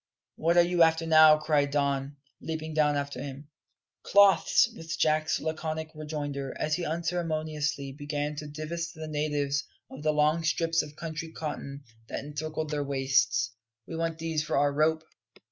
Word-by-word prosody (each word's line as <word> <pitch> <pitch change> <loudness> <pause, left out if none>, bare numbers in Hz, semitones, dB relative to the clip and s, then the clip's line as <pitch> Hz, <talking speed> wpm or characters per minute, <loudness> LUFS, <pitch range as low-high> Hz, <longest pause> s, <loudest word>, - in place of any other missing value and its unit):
"What 170 +2 +1
are 175 - +8
you 175 0 +1
after 165 0 +4
now?" 155 -1 +7
cried 150 -2 +1
Don, 140 0 -1 0.2
leaping 160 -1 -4
down 150 -1 +3
after 140 0 -3
him. 145 +1 -8 0.5
"Cloths," 200 +1 +5
was 165 -5 -5
Jack's 155 0 +2
laconic 160 0 -3
rejoinder, 145 -3 -5
as 155 - -1
he 175 - 0
unceremoniously 155 -4 -2
began 145 +1 -3
to 150 - -5
divest 165 +3 -5
the 160 0 -7
natives 145 -2 -1 0.3
of 130 - -9
the 155 0 +2
long 150 +2 +2
strips 165 0 +1
of 150 -1 -10
country 160 0 -6
cotton 145 -3 -6 0.2
that - - -4
encircled 155 +1 -4
their 145 -1 -1
waists. 130 -4 +1 0.3
"We 165 - -7
want 165 0 -2
these 160 -1 -1
for 150 - -1
our 145 0 +3
rope." 160 +2 +2
155 Hz, 160 wpm, -28 LUFS, 145-160 Hz, 0.5 s, are